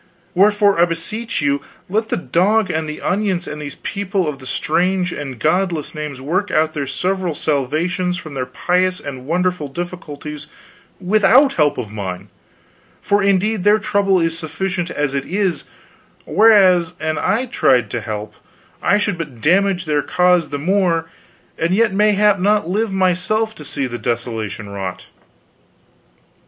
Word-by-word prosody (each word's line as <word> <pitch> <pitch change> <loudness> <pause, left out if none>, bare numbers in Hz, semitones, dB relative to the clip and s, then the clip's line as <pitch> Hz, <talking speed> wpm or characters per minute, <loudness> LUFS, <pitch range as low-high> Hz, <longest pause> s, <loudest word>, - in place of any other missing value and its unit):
Wherefore 205 0 +4
I - - +7
beseech 215 +7 -3
you 140 0 +1 0.3
let 220 +4 -1
the - - 0
dog 195 +4 +1
and 160 -1 -2
the 150 - -7
onions 190 -2 0
and 150 0 -6
these 145 -1 -6
people 200 -3 -2
of 145 -2 -4
the 130 - -11
strange 180 +5 0
and 135 -4 -6
godless 170 +2 0
names 150 -4 -5
work 180 +10 -1
out 155 0 +1
their 140 -3 -3
several 180 +3 -1
salvations 160 +6 -1
from 155 -4 -9
their 130 -2 -3
piteous 185 +7 0
and 130 -2 -8
wonderful 180 -2 0
difficulties 150 -2 -7 0.5
without 215 +8 +4
help 150 -3 +2
of 115 -5 -5
mine, 100 -2 -6 0.7
for 205 0 +1
indeed 200 +1 +1
their 205 +1 +5
trouble 200 -2 +1
is 165 -1 0
sufficient 175 +2 -3
as 145 -4 -1
it 140 -1 -2
is, 185 -4 -1 0.6
whereas 185 -6 +5
an 155 0 -1
I 220 +7 +1
tried 125 - +2
to 120 - -2
help 105 0 -5 0.5
I 205 - +3
should 205 -4 -1
but 145 -8 -6
damage 185 - +2
their 150 -1 +1
cause 180 0 +2
the 145 - -3
more 165 0 0 0.5
and 170 +3 +1
yet 220 -1 +2
mayhap 210 0 +3
not 205 -1 +2
live 210 +4 0
myself 190 +4 +1
to 155 - -11
see 140 -1 -2
the 120 -1 -5
desolation 110 -3 -3
wrought." 95 -2 -6
175 Hz, 155 wpm, -19 LUFS, 145-195 Hz, 0.7 s, I